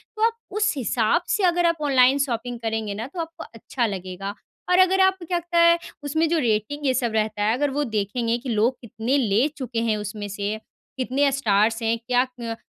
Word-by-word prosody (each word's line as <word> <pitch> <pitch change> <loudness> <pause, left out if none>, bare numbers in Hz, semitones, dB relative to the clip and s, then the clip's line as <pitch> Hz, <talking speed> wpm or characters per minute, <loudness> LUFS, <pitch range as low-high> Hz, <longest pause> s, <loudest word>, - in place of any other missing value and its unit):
तो 435 - -1
आप 460 0 0 0.2
उस 430 +1 +2
हिसाब 235 +2 +1
से 415 - +1
अगर 350 0 +2
आप 335 -1 +2
ऑनलाइन 265 -1 +4
शॉपिंग 240 -1 -4
करेंगे 220 -2 -2
ना, 225 +4 -5
तो 345 +6 -9
आपको 325 0 -7
अच्छा 235 +2 -2
लगेगा। 195 0 -5 0.4
और 360 0 +4
अगर 375 +1 +5
आपको 380 -2 +2
क्या 350 +1 0
लगता 345 0 -3
है, 335 0 +6 0.3
उसमें 315 +3 +1
जो 335 0 +2
रेटिंग 240 +4 -1
ये 260 - +3
सब 240 -2 0
रहता 215 -1 0
है, 215 +2 +3
अगर 290 +1 +1
वो 290 +2 0
देखेंगे 230 0 -1
कि 250 +2 -7
लोग 230 +3 +1
कितने 235 +3 -1
ले 230 0 +2
चुके 245 -4 -3
हैं 215 - +1
उसमें 210 0 -5
से, 205 +1 -3 0.4
कितने 265 +2 +1
स्टार्स 225 -3 +2
हैं, 225 +1 +1
क्या 250 -1 +3
अ, 245 -3 -6
245 Hz, 210 wpm, -23 LUFS, 220-295 Hz, 0.4 s, है